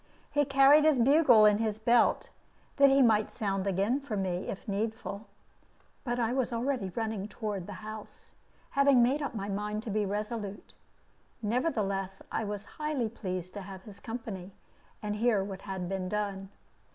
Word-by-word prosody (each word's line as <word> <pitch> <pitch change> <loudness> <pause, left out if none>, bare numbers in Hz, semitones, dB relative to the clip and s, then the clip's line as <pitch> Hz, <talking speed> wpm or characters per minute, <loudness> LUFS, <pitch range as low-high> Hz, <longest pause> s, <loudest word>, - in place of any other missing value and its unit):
He 290 0 +2
carried 275 +2 +6
his 310 -3 +4
bugle 250 -3 +6
in 210 0 +5
his 215 -2 -1
belt, 235 +2 +3 0.5
that 280 -1 +7
he 270 0 +5
might 215 -3 +3
sound 195 -4 -2
again 200 +8 +1
for 265 -7 -4
me, 185 -2 -2
if 195 - -6
needful. 210 0 -3 0.8
But 240 -2 -2
I 235 0 +1
was 260 -2 0
already 240 -3 -1
running 220 -3 -2
toward 210 -4 -4
the 205 - -6
house, 215 -1 -9 0.4
having 280 -3 +5
made 270 +5 +2
up 280 - -3
my 200 -2 -3
mind 210 +2 -3
to 225 - -5
be 210 0 0
resolute. 210 0 -4 0.7
Nevertheless, 205 - -1
I - - -1
was 205 0 -5 0.2
highly 295 -7 -1
pleased 185 -5 -5
to 205 - -6
have 190 -1 -9
his 205 -3 -12
company, 225 -6 -6 0.5
and 210 0 -2
hear 220 -3 +2
what 195 -1 -7
had 190 -3 -5
been 185 -1 -3
done. 200 -2 -3
215 Hz, 165 wpm, -30 LUFS, 195-245 Hz, 0.8 s, that